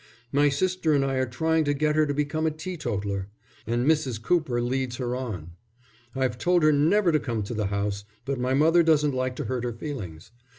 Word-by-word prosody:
My 145 +1 +4
sister 170 +2 +1
and 140 -1 +3
I 135 -1 -1
are 130 0 +1
trying 160 +6 +1
to 145 0 +1
get 150 +1 +1
her 155 -1 +3
to 145 - -1
become 150 +2 0
a - - +4
teetotaller. 105 - -4 0.4
And 120 +2 0
Mrs. 140 -7 +1
Cooper 135 -1 +1
leads 125 +1 -1
her 125 -1 -2
on. 105 -11 -5 0.6
I've 130 -2 -1
told 175 -2 +2
her 155 - +6
never 170 +6 +3
to 155 - +3
come 115 -6 -3
to 100 - -5
the 105 -3 -1
house, 100 0 -2 0.2
but 135 -2 -2
my 130 +1 +1
mother 165 +4 +5
doesn't 150 -3 +3
like 130 0 -1
to 145 - -4
hurt 125 +1 -2
her 120 -1 -2
feelings. 115 - -7
135 Hz, 210 wpm, -26 LUFS, 120-155 Hz, 0.6 s, her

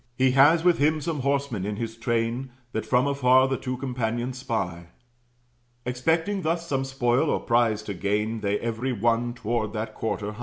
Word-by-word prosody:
He 130 0 +4
has 145 +5 +5
with 175 -1 +4
him 155 +2 +3
some 155 0 -3
horsemen 140 -6 -1
in 105 +1 -2
his 115 +1 -4
train, 115 +2 -1 0.2
That - - -3
from 125 +1 +3
afar 130 -2 +4
the 135 - 0
two 130 -1 -4
companions 125 -1 -3
spy. 90 -10 -3 1.0
Expecting 160 +10 0
thus 170 0 -1
some 135 -3 -1
spoil 135 +2 +1
or - - +1
prize 115 -3 +1
to 105 - -5
gain, 105 +4 -1
They, 100 -1 0
every 115 +3 -2
one, 120 +2 0
toward 110 -2 -2
that 110 0 -4
quarter 105 -2 -3
hie. 105 - -12
125 Hz, 180 wpm, -25 LUFS, 110-135 Hz, 1.0 s, has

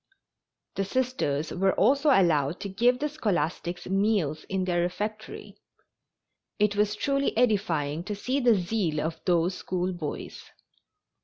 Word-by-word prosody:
The 195 - -1
Sisters 195 - -1
were 190 +1 +1
also 275 +8 +3
allowed 165 - +3
to 200 - -4
give 240 +6 +2
the 295 +3 -1
scholastics 175 - -2
meals 195 -6 0
in 190 -1 -1
their 175 -1 +1
refectory. 210 +5 -5 1.0
It 210 -1 +2
was 210 0 +1
truly 275 +1 0
edifying 195 -10 +1
to 210 - -3
see 255 +7 -1
the 240 -4 +4
zeal 180 -4 -1
of 160 +1 -3
those 175 0 +2
school 180 0 -2
boys. 155 -4 -6
195 Hz, 135 wpm, -27 LUFS, 175-220 Hz, 1.0 s, the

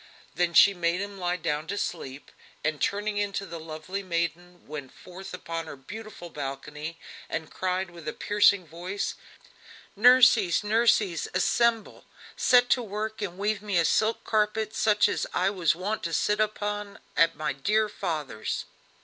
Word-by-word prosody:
Then 175 -1 0
she 200 - +8
made 175 -1 0
him 200 0 -5
lie 180 0 0
down 155 -2 -2
to 200 - -3
sleep, 140 -8 -5 0.3
and 155 -1 -1
turning 205 +1 0
into 200 -1 -1
the 170 -2 -7
lovely 160 +5 -6
maiden 175 0 -3
went 145 -3 -7
forth 185 +1 -11
upon 165 -2 -5
her - - -7
beautiful 205 +4 -9
balcony, 150 +3 -6 0.3
and 160 -1 -4
cried 185 0 -2
with 170 -3 -12
a - - -2
piercing 205 -2 +3
voice: 175 +5 -4 0.8
"Nurseys 225 -4 +6
nurseys! 210 -4 +2
assemble, 230 +4 +1 0.3
set 245 -1 +5
to 250 - +4
work 215 0 -4
and 185 -3 -4
weave 205 +1 -1
me 205 -3 -1
a 165 - +4
silk 220 +6 +1
carpet 215 0 0
such 210 -1 +4
as - - -1
I 195 - +2
was 180 -5 +2
wont 200 +5 -3
to 165 - -3
sit 210 +5 +1
upon 205 -1 -2 0.2
at 165 0 +4
my 150 -2 -2
dear 210 +11 +1
father's!" 155 - -3
185 Hz, 160 wpm, -27 LUFS, 165-210 Hz, 0.8 s, she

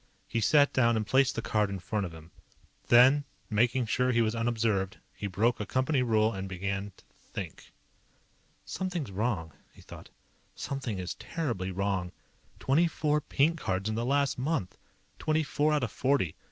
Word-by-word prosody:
He 115 - -1
sat 145 +4 +4
down 115 -3 +3
and 110 - -1
placed 135 +3 +3
the 115 - -3
card 105 -2 +1
in 100 - -3
front 100 +1 -2
of - - -11
him. 80 +1 -13 0.6
Then, 130 +4 +6 0.3
making 120 +3 +2
sure 125 +3 +1
he 120 -1 +3
was 110 -1 0
unobserved, 115 -4 0 0.2
he 100 - -5
broke 110 +6 +1
a 105 - -2
company 130 +1 +1
rule 110 -2 +2
and 95 -1 -5
began 100 +2 -3
to - - -20 0.3
Think. - - -7 0.9
Something's 175 - -3
wrong, 95 - -2 0.2
he - - -17
thought. - - -12 0.5
_Something 130 -7 -4
is 90 -1 -4
terribly 120 - -3
wrong. 95 -1 -1 0.5
Twenty 155 +6 +3
four 150 -2 0
pink 155 +4 +1
cards 95 +2 -1
in - - -1
the 115 +2 -1
last 140 +1 +1
month. 130 - -1 0.4
Twenty 155 0 +1
four 150 +1 +1
out 150 -3 +1
of 115 - -2
forty. 130 - +1
115 Hz, 170 wpm, -29 LUFS, 100-135 Hz, 0.9 s, Then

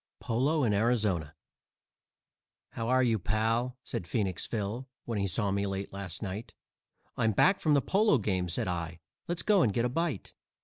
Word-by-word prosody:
POLO 140 +6 +1
IN 110 -4 +2
ARIZONA 100 -8 +1 1.4
"How 115 - -4
are 130 0 +4
you, 115 -3 +2
pal?" 115 +6 0
said 85 - -4
Phoenix 95 -2 -1
Phil, 115 +4 -3 0.2
when 115 -3 -2
he 100 - +1
saw 100 +2 0
me 100 +1 0
late 95 0 -4
last 100 -1 -6
night; 100 +3 -6 0.6
"I'm 110 -1 +2
back 190 - +4
from 150 -2 +3
the 140 - +3
polo 205 -5 +3
game," 95 -5 -1
said 85 - -1
I, 85 -2 -3 0.3
"let's 170 -1 -2
go 205 -3 +4
and 115 - +3
get 115 +4 +1
a - - +1
bite." 155 - -2
110 Hz, 175 wpm, -30 LUFS, 95-125 Hz, 1.4 s, are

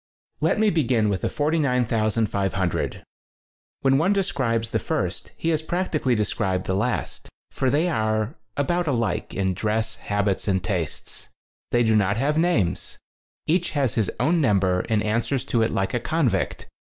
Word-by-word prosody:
Let - - +2
me 215 -1 +3
begin 125 -9 +2
with 95 -2 -1
the - - 0
49,500. 115 - 0 0.8
When 135 0 +4
one 180 +6 +3
describes 125 - 0
the - - +1
first - - -3
he 165 - -1
has 160 -2 +1
prac 175 +3 -2
tically 130 -6 +1
described 95 -3 -1
the 95 - -1
last, 115 +6 -2 0.2
for 130 - 0
they 150 +6 +2
are 110 -5 0 0.2
about 175 +4 0
alike 115 -10 -1
in 95 -1 0
dress, 110 +3 -1
habits 100 -1 -1
and 95 -2 +1
tastes. 90 -5 -4 0.4
They 120 0 +3
do 110 -1 +3
not 100 0 +2
have 140 +5 +1
names; 155 - +1 0.5
each 175 +1 +1
has 135 -6 +1
his 110 -4 +1
own 165 +2 +2
number 95 -7 +2
and 110 -2 +2
answers 115 +5 0
to 115 - +1
it 110 - +2
like 95 0 -1
a 120 - +1
convict. 150 0 -1
115 Hz, 160 wpm, -24 LUFS, 105-150 Hz, 0.8 s, When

